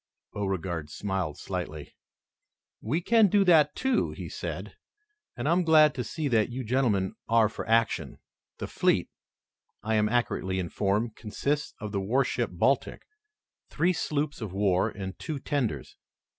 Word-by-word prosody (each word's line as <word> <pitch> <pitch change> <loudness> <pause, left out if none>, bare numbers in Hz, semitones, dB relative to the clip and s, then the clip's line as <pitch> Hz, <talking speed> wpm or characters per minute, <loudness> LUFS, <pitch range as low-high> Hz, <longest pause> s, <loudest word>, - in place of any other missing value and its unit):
Beauregard 90 -6 -3
smiled 95 -5 -3
slightly. 85 -5 -6 0.9
"We 150 +10 -1
can 225 +3 +5
do 200 +1 +4
that, 160 -5 +5
too," 265 0 +1
he - - -7
said, - - -6 0.6
"and - - -2
I - - +3
am 180 +1 +3
glad 155 -2 +6
to 125 - -3
see 150 +7 -3
that 110 -3 +2
you 125 +2 -4
gentlemen 110 -6 +1 0.2
are 115 -1 +5
for 110 - -7
action. 115 0 +1 0.4
The - - -4
fleet, - - +1 0.7
I 110 - -1
am 105 -1 +3
accurately 110 -5 0
informed, 100 +5 -1
consists 140 +7 -2
of 105 -1 -5
the 100 -1 -1
warship 120 +2 0
Baltic, 130 +10 0 0.7
three 180 +2 +1
sloops 150 -4 -2
of 105 -5 -5
war 95 -2 +2
and 95 -1 -7
two 155 -3 -4
tenders. 140 -4 -3
115 Hz, 145 wpm, -28 LUFS, 95-145 Hz, 0.9 s, glad